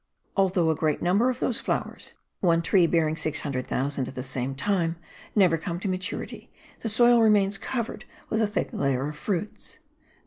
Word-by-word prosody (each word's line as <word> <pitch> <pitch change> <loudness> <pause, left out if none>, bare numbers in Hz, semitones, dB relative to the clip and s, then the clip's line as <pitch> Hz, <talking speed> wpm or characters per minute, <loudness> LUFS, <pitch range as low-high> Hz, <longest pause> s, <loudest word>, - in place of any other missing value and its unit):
Although 185 -4 +3
a - - 0
great 155 -1 0
number 200 +8 +3
of 255 -1 -3
those 240 - +1
flowers - - -3 0.2
(one 170 -2 +3
tree 175 0 +4
bearing 160 -2 +1
600,000 140 -3 -1
at - - -9
the 130 - -4
same 130 0 -3
time) 170 +2 0 0.4
never 180 -6 +4
come 170 +1 -4
to 195 - -3
maturity,* 185 0 -4 0.3
the 225 - -3
soil 240 +2 +5
remains 205 -2 +3
covered 235 -3 -4 0.2
with 220 - 0
a 220 - +3
thick 205 - -2
layer 135 -1 0
of 150 - -8
fruits. 195 +6 -4
175 Hz, 170 wpm, -26 LUFS, 150-205 Hz, 0.4 s, soil